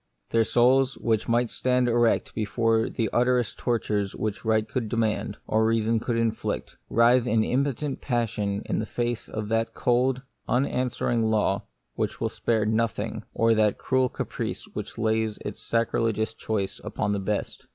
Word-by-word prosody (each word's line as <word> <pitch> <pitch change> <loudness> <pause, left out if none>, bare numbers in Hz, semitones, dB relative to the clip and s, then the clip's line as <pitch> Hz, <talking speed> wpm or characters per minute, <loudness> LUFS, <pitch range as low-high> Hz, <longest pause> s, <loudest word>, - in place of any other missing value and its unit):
Their 115 -1 +3
souls, 130 +3 +3
which 110 -2 0
might 120 0 +2
stand 125 -1 +1
erect 120 -1 +2
before 115 +1 +1
the 115 - -1
utterest 120 -4 +1
tortures 105 -4 -1
which 105 -1 -3
right 110 -1 +2
could 115 -1 -3
demand, 110 -2 -1
or 110 +1 +2
reason 115 0 +2
could 115 +1 -1
inflict, 115 -1 -2
writhe 120 +1 +4
in 110 -1 +3
impotent 140 +3 -1
passion 110 -5 -1
in - - -1
face 120 +1 -3
of 110 -1 -4
that 115 0 0
cold, 125 +2 +1 0.3
unanswering 125 -2 +1
law 105 -2 +1 0.3
which - - -2
will - - 0
spare 110 -2 0
no 110 +2 +2
thing, - - -5
or 115 0 +4
that 110 -2 +2
cruel 130 -1 +1
caprice - - -4
which - - -6
lays 110 -1 0
its - - -5
sacrilegious 115 -1 0
choice 100 -3 -3
upon 105 -1 -2
the 100 - 0
best. 100 +1 -3
115 Hz, 155 wpm, -26 LUFS, 110-120 Hz, 0.3 s, writhe